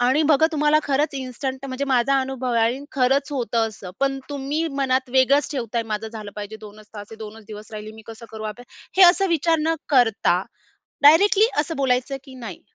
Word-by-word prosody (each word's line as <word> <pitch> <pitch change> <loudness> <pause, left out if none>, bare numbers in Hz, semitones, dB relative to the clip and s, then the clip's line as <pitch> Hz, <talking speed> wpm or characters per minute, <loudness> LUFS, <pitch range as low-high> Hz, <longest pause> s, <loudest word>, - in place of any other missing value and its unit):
आणि 260 +6 +3
बघा, 310 +2 +5
तुम्हाला 300 0 +3
खरंच 290 +1 0
इन्स्टंट 265 +1 -5
म्हणजे, 265 +1 -3
माझा 270 +1 +2
अनुभव 260 -1 -3
आहे. 230 +3 +1
खरंच 275 +2 +1
होतं 230 -4 0
असं. 200 -4 -10
पण, 275 0 0
तुम्ही 285 +4 -2 0.2
मनात 260 -1 0
वेगळंच 265 +2 +3
ठेवताय, 235 -3 -2
"माझं 215 +1 -3
झालं 215 -2 -8
पाहिजे, 210 +1 -6
2च 215 0 -13
तास 205 -1 -8
हे, 225 - -10
2च 220 0 -10
दिवस 215 +1 -10
राहिले, 215 0 -7
मी 220 - -13
कसं 225 0 -10
करू 220 0 -8
आता?" 245 - -13 0.3
हे 385 - +7
असं 390 +2 0
विचार 330 0 +2
न 325 +1 +1
करता, 225 -9 +3 0.6
डायरेक्टली 390 +8 +6
असं 315 +2 -4
बोलायचं 265 0 0
की 265 - -13
नाही, 230 -8 -9
260 Hz, 190 wpm, -22 LUFS, 225-280 Hz, 0.6 s, हे